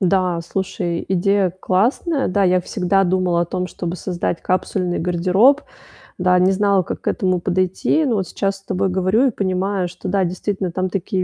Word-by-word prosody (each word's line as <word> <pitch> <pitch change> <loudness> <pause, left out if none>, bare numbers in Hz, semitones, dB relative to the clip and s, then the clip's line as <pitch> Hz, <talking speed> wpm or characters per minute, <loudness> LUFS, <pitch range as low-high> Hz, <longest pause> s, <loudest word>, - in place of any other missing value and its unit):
Да. 185 -2 +1
Слушай, 175 -1 -3
идея 190 +1 +2
классная. 255 - +1
Да, 200 +1 +1
я 185 0 +3
всегда 190 +1 0
думала 180 -1 +1
о - - 0
том, 180 +1 -3
чтобы 175 -1 -5
создать 175 -1 -3
капсульный 185 -1 -1
гардероб. 185 - +3 0.6
Да. 180 0 +3
Не 185 +1 +4
знала, 200 -1 +2
как - - -6
к - - -10
этому 185 -2 0
подойти. 185 - +1
Но 245 -5 +1
вот 190 -3 -1
сейчас 195 -1 -2
с - - -20
тобой 195 0 -1
говорю 190 +8 +2
и - - +1
понимаю, 190 -1 -1
что, 180 - -9
да, 195 +1 +1
действительно, 185 +1 -2
там 185 +2 -2
такие 185 0 -2
185 Hz, 180 wpm, -20 LUFS, 180-195 Hz, 0.6 s, Не